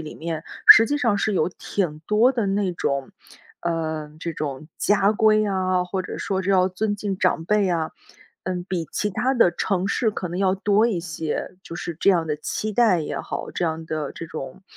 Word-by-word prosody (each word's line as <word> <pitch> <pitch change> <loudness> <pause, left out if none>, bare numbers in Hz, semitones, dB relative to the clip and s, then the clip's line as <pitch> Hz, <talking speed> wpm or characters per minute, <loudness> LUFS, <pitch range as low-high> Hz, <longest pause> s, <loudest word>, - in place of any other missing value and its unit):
里 155 -1 -8
面， 160 -1 -5 0.2
实 225 - +10
际 290 +3 0
上 230 -7 +1
是 215 +1 0
有 170 -2 +2
挺 180 -3 -3
多 220 +4 +4
的 230 -5 -1
那 195 -1 0
种 140 -5 -2 0.5
呃， 160 -3 -3
这 170 - -3
种 150 -1 -5
家 200 0 +3
规 215 0 +3
啊， 185 -2 +1
或 185 +1 -3
者 - - -6
说 190 -1 -1
是 190 +1 -1
要 185 -1 +4
尊 205 +3 -1
敬 200 -2 -4
长 180 -3 +1
辈 210 +1 +2
啊。 165 -3 -1 0.5
嗯， 180 -1 -3
比 175 -4 -3
其 210 - -1
他 245 +7 0
的 235 -8 +5
城 185 +2 -1
市 220 +3 +1
可 190 - -4
能 175 +1 -5
要 190 -1 +2
多 205 +3 +2
一 215 -7 -1
些， 165 +1 -4
就 165 - -8
是 170 - -5
这 - - +3
样 175 -4 +3
的 150 - -1
期 215 +7 -3
待 215 -4 +4
也 155 - -4
好， - - -5
这 175 - -1
样 160 0 -3
的 155 -3 -4
这 165 - -8
种， 155 +3 -8
185 Hz, 225 characters per minute, -23 LUFS, 165-205 Hz, 0.5 s, 实